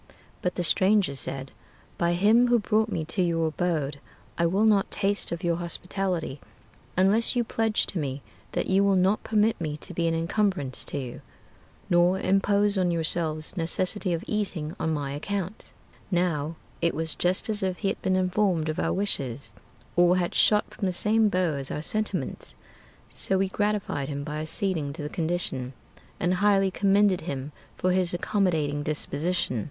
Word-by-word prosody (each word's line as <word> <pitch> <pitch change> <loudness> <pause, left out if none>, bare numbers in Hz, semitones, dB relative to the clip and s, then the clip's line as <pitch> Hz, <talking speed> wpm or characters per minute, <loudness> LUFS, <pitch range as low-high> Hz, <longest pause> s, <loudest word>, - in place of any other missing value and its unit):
But 180 - -1
the 175 - -1
stranger 190 -1 +4
said, 135 0 -5 0.5
"By 170 0 +2
Him 215 +7 +4
who 240 0 +4
brought 220 0 +1
me 165 -5 -2
to 175 +4 0
your 165 -2 +1
abode, 155 -4 -2 0.4
I 170 - +2
will 195 +6 +2
not 205 -3 +3
taste 205 0 +1
of 170 0 -4
your 170 -1 +1
hospitality, 175 -3 -3 0.6
unless 205 +7 +3
you 240 - +2
pledge 225 -1 0
to 185 - -4
me 140 -2 -4 0.3
That - - 0
you 190 +1 +3
will 200 -1 +3
not 190 +3 +2
permit 220 -1 +1
me 150 -2 -3
to 180 - -4
be 170 0 0
an 165 - +1
incumbrance 165 -5 -1
to - - -3
you, 125 -3 -6 0.7
Nor 175 +2 +3
impose 200 +1 +2
on 180 -1 +2
yourselves 160 -1 0
necessity 185 +3 0
of 170 0 -1
eating 190 -7 -2
on 160 - 0
my 145 -3 -2
account." 195 +6 -4 0.4
Now 165 -4 0 0.3
it 170 0 +1
was 160 0 -1
just 180 +1 +1
as 215 -1 0
if 185 -1 -1
he 195 - -1
had - - -4
been 185 -1 +1
informed 185 -3 +1
of 155 - -2
our - - 0
wishes, 135 - -2 0.4
Or 175 +1 +5
had 175 -1 -1
shot 210 -1 +4
from 195 - -2
the 185 - -1
same 215 +4 +2
bow 180 -4 +1
as 135 -1 -4
our 150 - -4
sentiments; 215 +5 -2 0.6
So 190 - +1
we 190 0 +1
gratified 205 -9 -1
him 140 -1 -4
by 150 +1 -4
acceding 155 -2 -1
to 150 - -5
the 150 - -4
condition, 160 -7 -2 0.5
And 175 +1 +1
highly 195 -2 +4
commended 200 -1 +3
him 140 -3 -5 0.3
for 185 - +1
his 180 -1 +3
accommodating 160 -7 0
disposition. 150 -2 -1
180 Hz, 175 wpm, -26 LUFS, 155-200 Hz, 0.7 s, Or